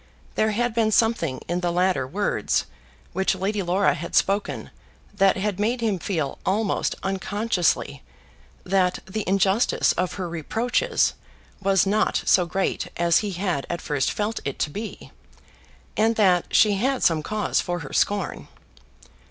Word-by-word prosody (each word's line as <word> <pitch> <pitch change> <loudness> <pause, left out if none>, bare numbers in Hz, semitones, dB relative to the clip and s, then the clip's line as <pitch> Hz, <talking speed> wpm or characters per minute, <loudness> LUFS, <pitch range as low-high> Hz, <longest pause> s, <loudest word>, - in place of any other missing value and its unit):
There 215 - +2
had 240 +2 0
been 225 -1 +2
something 215 - +1
in 175 +1 -1
the 175 -1 -1
later 180 -6 +1
words 200 +9 0 0.5
which 190 +1 +1
Lady 200 +2 -1
Laura 185 +2 +2
had 170 +3 -6
spoken 200 +1 0 0.4
that 195 -1 +3
had 200 0 -2
made 235 +4 0
him 215 -5 0
feel 160 -7 -2
almost 205 +2 0
unconsciously 195 0 0 0.6
that 185 -1 +1
the 205 +3 -4
injustice 195 +3 +2
of 185 +1 -1
her 185 -3 -4
reproaches 220 +9 0 0.5
was 195 -1 +3
not 210 +2 +1
so 180 -2 +4
great 190 +3 -1
as 170 -1 +4
he 205 -2 -3
had 175 -6 -2
at 170 - -2
first 145 -3 -1
felt 215 +2 -2
it 140 - -4
to 150 - -1
be, 210 +6 -7 0.8
and 225 +1 +2
that 185 -5 +3
she 210 -2 +4
had 260 +5 0
some 160 -2 +3
cause 210 +7 0
for 175 -1 -3
her 140 - -8
scorn. 205 -2 0
195 Hz, 150 wpm, -24 LUFS, 175-215 Hz, 0.8 s, so